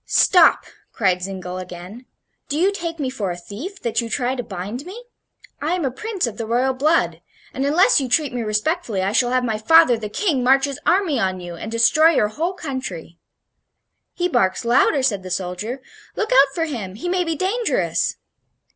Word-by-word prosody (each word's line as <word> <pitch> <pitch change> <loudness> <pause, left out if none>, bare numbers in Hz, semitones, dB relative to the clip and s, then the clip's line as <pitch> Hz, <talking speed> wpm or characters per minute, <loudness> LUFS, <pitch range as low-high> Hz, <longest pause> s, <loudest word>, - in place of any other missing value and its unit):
"Stop!" 355 -4 +5 0.3
cried 185 -4 +1
Zingle, 185 -1 -5
again; 180 +7 -10 0.4
"do 290 - -1
you 370 +5 +3
take 335 -4 -5
me 270 -4 -2
for 210 -8 -3
a 175 - -4
thief, 270 - -8
that 235 0 0
you 230 - -6
try 250 +1 -1
to 260 - -3
bind 205 +4 -6
me? 400 +8 -10 0.6
I 315 +5 0
am 350 -5 -2
a 265 - -1
prince 395 - -3
of 230 -3 -6
the 225 - -3
royal 250 +3 +1
blood, 305 +6 +1 0.3
and 270 +2 -1
unless 315 +1 +4
you 260 - -3
treat 285 +1 +1
me 245 - -2
respectfully 215 - -1
I 195 - 0
shall 245 +3 +2
have 255 0 +1
my 220 -3 -1
father, 255 0 +5
the 210 -2 -5
King, 285 - 0
march 270 +2 +4
his 280 0 -5
army 345 -7 +2
on 185 -3 -1
you 175 -1 -8
and 215 +6 -7
destroy 235 +8 +5
your 210 - +2
whole 330 - -2
country." 260 - -6 1.0
"He 355 - 0
barks 235 - 0
louder," 260 +4 +3
said 210 -7 +1
the 185 - -9
soldier. 190 +8 -4 0.3
"Look 440 +3 -2
out 275 - +5
for 330 - 0
him; 215 - -6
he 240 - -6
may 360 0 +1
be 330 -2 -2
dangerous." 410 +8 0
255 Hz, 200 wpm, -21 LUFS, 210-325 Hz, 1.0 s, Stop